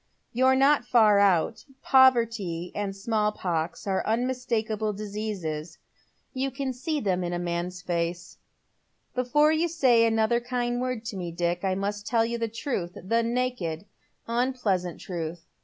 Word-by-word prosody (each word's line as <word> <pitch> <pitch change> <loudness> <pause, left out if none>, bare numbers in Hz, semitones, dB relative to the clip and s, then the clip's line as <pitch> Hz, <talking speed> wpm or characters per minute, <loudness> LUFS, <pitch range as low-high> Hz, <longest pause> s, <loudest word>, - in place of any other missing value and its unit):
You're 260 +2 +4
not 275 +1 +4
far 220 -4 +5
out. 195 +1 +2 0.2
Poverty 230 -10 +3
and 200 -1 -3
«malI 215 -2 +1
pox 165 -2 -2
are 195 -2 0
unmistakable 225 -3 -1
diseases. 195 -7 -5 0.6
You 265 +1 -1
can 265 0 -3
see 300 +5 -2
them 185 -7 0
in 175 0 -2
a - - -1
man's 175 +1 -3
face. 170 -1 -3 0.7
Before 275 +5 +3
you 320 +2 +2
say 255 -9 +4
another 225 +1 +2
kind 245 0 -2
word 255 -3 -3
to 225 -4 -5
me, 175 -2 -4
Dick, 175 +1 -1
I 190 -1 +1
must 205 +2 -3
tell 230 -2 +2
you 235 0 -3
the 230 - 0
truth 215 -6 -4
— - - -22
the 230 0 +3
naked, 230 -8 -2 0.4
unpleasant 230 -8 -1
truth. 170 -2 -5
220 Hz, 150 wpm, -27 LUFS, 180-250 Hz, 0.7 s, far